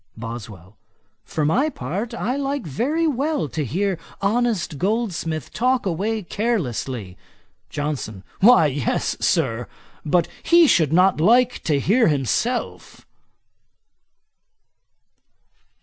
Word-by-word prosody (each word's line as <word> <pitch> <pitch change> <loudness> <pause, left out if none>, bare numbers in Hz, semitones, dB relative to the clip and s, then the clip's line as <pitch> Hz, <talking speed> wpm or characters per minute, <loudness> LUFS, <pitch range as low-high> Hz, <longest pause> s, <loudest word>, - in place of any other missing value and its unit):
BOSWELL. 110 -4 -9 0.5
'For 155 - -2
my 260 - +2
part, 230 - -5
I 245 +2 -2
like 280 -3 -2
very 275 - -1
well 295 - 0
to 155 +1 -3
hear 185 - -1 0.2
honest 200 - 0
Goldsmith 180 - -2
talk 250 +2 +1
away 200 +5 -1
carelessly.' 130 - -3 0.5
JOHNSON. 140 -10 -4 0.2
'Why 230 -4 +6
yes, 140 -3 -1
Sir; 125 -9 0 0.4
but 165 +2 +2
he 340 0 +5
should 160 - +3
not 180 0 +3
like 245 +6 +3
to 145 -3 +2
hear 225 - +3
himself.' 155 - -2
185 Hz, 100 wpm, -22 LUFS, 145-240 Hz, 0.5 s, Why